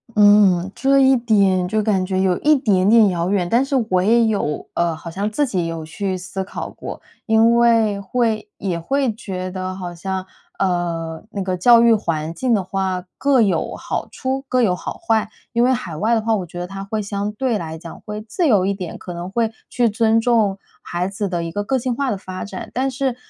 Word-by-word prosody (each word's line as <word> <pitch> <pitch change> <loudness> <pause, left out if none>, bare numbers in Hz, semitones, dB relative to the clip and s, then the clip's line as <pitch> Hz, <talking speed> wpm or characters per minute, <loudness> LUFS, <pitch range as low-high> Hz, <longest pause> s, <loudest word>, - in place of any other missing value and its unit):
嗯， 205 -3 +5
这 275 +2 +3
一 265 0 +5
点， 200 -6 +2
就 215 +2 0
感 195 -3 +1
觉 190 0 -1
有 185 -2 +2
一 305 0 +4
点 200 -8 +2
点 225 -1 +6
遥 175 -1 -1
远， 180 -4 0
但 240 +3 +3
是 275 - -2
我 185 -1 +2
也 230 +3 +4
有 200 -9 -1
呃， 170 -1 0
好 165 +2 -9
像 200 +5 -3
自 290 +6 +1
己 185 -8 -1
有 165 -1 -4
去 185 +3 -3
思 190 +1 -5
考 190 - -6
过， - - -8 0.2
因 225 +1 +4
为 225 -4 +3
会 220 0 -1
也 185 -4 -2
会 270 +6 0
觉 185 -4 -5
得 185 0 -4
好 180 -2 -6
像， 190 +2 -4 0.3
呃 170 -3 -1
那 200 - -3
个 185 -1 -1
教 235 +5 +6
育 235 -1 +6
环 165 -6 -2
境 250 +7 0
的 200 -4 +2
话， 185 -1 -2
各 275 -3 +3
有 190 -7 0
好 - - -4
处 265 0 -3
各 255 -1 +2
有 185 -6 +2
好 - - -5
坏。 225 -10 0 0.2
因 235 0 +3
为 255 +1 +4
海 185 -10 -4
外 220 +9 +1
的 225 - +2
话， 225 0 +1
我 190 -4 -3
觉 175 +1 -9
得 175 - -4
它 195 +1 -7
会 215 +2 -3
相 205 0 -3
对 235 +1 -1
来 160 -3 -6
讲 170 -1 -10
会 210 0 -5
自 225 - -2
由 205 -8 +4
一 200 - +1
点， 185 -4 -6
可 180 - -7
能 175 +2 -6
会 225 0 0 0.2
去 245 -2 +2
尊 225 +1 +2
重 225 -4 +2 0.2
孩 175 +1 -2
子 200 +1 -3
的 170 -2 -2
一 165 - -4
个 205 +4 -2
个 265 +6 0
性 245 0 -2
化 275 0 -1
的 200 - -2
发 185 -1 -7
展， 195 -2 -7
但 265 +2 0
是， 260 -1 -1
200 Hz, 240 characters per minute, -20 LUFS, 185-230 Hz, 0.3 s, 点